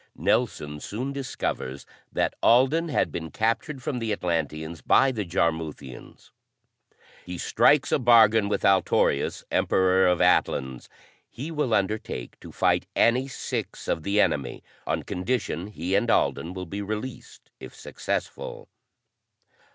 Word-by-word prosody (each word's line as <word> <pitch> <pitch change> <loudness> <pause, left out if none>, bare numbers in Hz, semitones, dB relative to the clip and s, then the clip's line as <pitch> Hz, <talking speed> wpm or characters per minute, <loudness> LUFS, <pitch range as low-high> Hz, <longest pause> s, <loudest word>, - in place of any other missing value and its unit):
Nelson 75 0 0
soon 125 - -5
discovers 70 - -4 0.3
that - - 0
Alden 135 +8 +4
had 145 - 0
been 80 -1 -5
captured 120 - -2
from 125 -1 -2
the 115 -2 -2
Atlanteans 80 -4 -2
by 135 0 +4
the 110 -5 -3
Jarmuthians. 80 -7 -4 0.9
He 90 0 -7
strikes 145 - +3
a - - +3
bargain 110 -4 +5
with - - -1
Altorius, 95 -1 +2
Emperor 95 0 +3
of 90 -1 +2
Atlans. 65 -2 +1 0.4
He 145 +7 -7
will 150 -7 0
undertake 100 - -3
to - - -11
fight - - +1
any 125 +3 +3
six 135 - -5
of - - -1
the 100 +5 0
enemy 70 -10 0 0.2
on - - -1
condition 95 -2 -2
he 95 -3 -4
and 105 +4 +2
Alden 90 -4 +1
will 90 -1 -5
be 100 +4 -5
released 110 +5 -7
if - - -11
successful. 485 -1 -5
100 Hz, 130 wpm, -25 LUFS, 85-125 Hz, 0.9 s, bargain